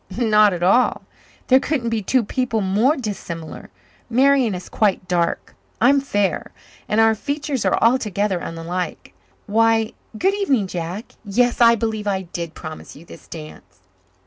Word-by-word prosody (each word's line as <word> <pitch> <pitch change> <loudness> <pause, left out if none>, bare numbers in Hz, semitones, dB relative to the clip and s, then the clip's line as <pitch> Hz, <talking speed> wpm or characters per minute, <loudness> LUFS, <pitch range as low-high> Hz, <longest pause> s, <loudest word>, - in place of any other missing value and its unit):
Not 215 -3 +4
at 175 -1 -3
all. 240 +8 +3 0.4
There 260 0 +5
couldn't 265 -6 -2
be 225 -1 0
two 250 +5 +1
people 230 0 -1
more 210 +10 +2
dissimilar. 170 - -6 0.4
Marian 260 -3 +3
is 180 - -8
quite 200 -4 0
dark. 175 -1 -1 0.3
I 245 - +5
am 280 0 +4
fair. 205 -8 -1 0.4
And 210 - +1
our 225 0 +5
features 285 +3 -3
are - - +2
altogether 210 -5 +1
unlike. 165 - -5 0.3
Why, 225 +1 +2 0.2
good 385 - +2
evening, 280 - +1
Jack. 180 +3 -5
Yes, 240 +4 +1
I 235 0 +7
believe 220 -2 -3
I 190 -1 -1
did 170 -2 -6
promise 155 -1 -9
you 160 - -14
this - - -14
dance." 95 - -11
215 Hz, 150 wpm, -21 LUFS, 180-245 Hz, 0.4 s, I